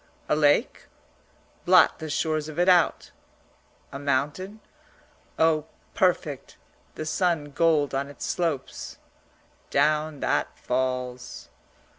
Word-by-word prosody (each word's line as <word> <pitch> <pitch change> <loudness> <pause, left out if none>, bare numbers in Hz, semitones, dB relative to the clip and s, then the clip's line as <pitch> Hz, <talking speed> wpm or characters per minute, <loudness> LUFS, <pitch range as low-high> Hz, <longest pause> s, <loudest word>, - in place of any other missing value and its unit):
A - - +2
lake? 145 -1 +2 0.8
Blot - - +5
the 160 - -6
shores 155 0 -1
of 155 - -9
it 175 +1 +2
out! 180 -3 +3 0.8
A 140 - -6
mountain? 145 +9 -2 0.8
Oh, 160 -1 +2 0.3
perfect 160 -7 -1 0.4
the 155 - -5
sun 160 -3 0
gold 155 -2 +2
on 140 +1 -2
its 145 - -7
slopes. 160 -7 -3 0.7
Down 155 -1 +1
that - - -1
falls. 125 0 -3
150 Hz, 105 wpm, -25 LUFS, 140-165 Hz, 0.8 s, Blot